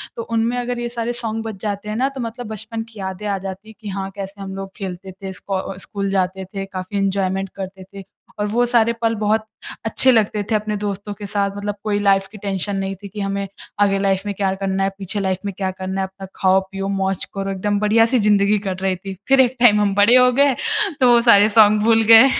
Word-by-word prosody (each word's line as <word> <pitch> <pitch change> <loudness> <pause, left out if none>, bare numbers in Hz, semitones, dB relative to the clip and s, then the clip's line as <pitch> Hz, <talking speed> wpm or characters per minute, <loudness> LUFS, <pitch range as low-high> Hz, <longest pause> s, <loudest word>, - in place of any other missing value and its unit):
तो 230 - -4
उनमें 230 +1 0
अगर 245 0 -2
ये 240 0 -3
सारे 235 0 -3
सॉन्ग 225 -2 -3
बज 220 -3 -6
जाते 210 0 -3
हैं 215 - -3
ना 265 +3 +1
तो 270 -2 -7
मतलब 235 +1 -5
बचपन 220 +1 -5
की 220 - -13
यादें 190 +2 -5
आ 200 -1 0
जाती 190 +2 -7
है 220 - -11
कि 215 - -9
हाँ, 195 0 -4
कैसे 195 0 -7
हम 190 -1 -6
लोग 195 0 -6
खेलते 190 -1 -6
थे 190 +1 -8
स्को 190 0 -4
स्कूल 200 -1 -4
जाते 190 0 -1
थे 195 0 -3
काफ़ी 190 +1 -5
एन्जॉयमेंट 195 -1 0
करते 190 -1 -7
थे। 195 -1 -8 0.4
और 205 - +1
वो 240 +4 +2
सारे 235 -1 +3
पल 225 0 +1
बहुत 215 +1 +1 0.4
अच्छे 260 +3 +4
लगते 215 -3 +2
थे - - +4
अपने 210 0 -1
दोस्तों 205 0 -4
के 205 0 -8
साथ 200 0 -1
मतलब 205 0 -3
कोई 205 -1 0
लाइफ़ 195 -1 +3
की 215 - -10
टेंशन 200 0 -3
नहीं 195 0 -2
थी 200 - -5
कि 205 +2 -9
हमें 195 0 -2 0.3
आगे 195 -1 +3
लाइफ़ 195 -1 +1
में 205 - -2
क्या 195 -1 0
करना 195 0 -1
है 195 - +2
पीछे 195 +1 -3
लाइफ़ 190 -2 -1
में 200 - -3
क्या 190 -2 -1
करना 190 0 -4
है। 190 - -1
अपना 190 0 -11
खाओ-पियो 190 +1 +1
मौज 190 -1 -1
करो 195 0 -3
एकदम 205 +1 -1
बढ़िया-सी 225 +4 +3
ज़िंदगी 205 0 +3
कट 185 0 -3
रही 190 -1 +1
थी। 195 +2 -7
फ़िर 270 0 +5
एक 255 0 +2
टाइम 210 -4 +6
हम 200 -1 +2
बड़े 205 +5 +6
हो 250 0 +6
गए 280 -2 +4 0.4
तो 250 -2 +5
वो 235 -1 +6
सारे 205 +1 +6
सॉन्ग 210 0 +6
भूल 225 0 +4
गए 250 +4 +9
200 Hz, 240 wpm, -20 LUFS, 195-220 Hz, 0.4 s, गए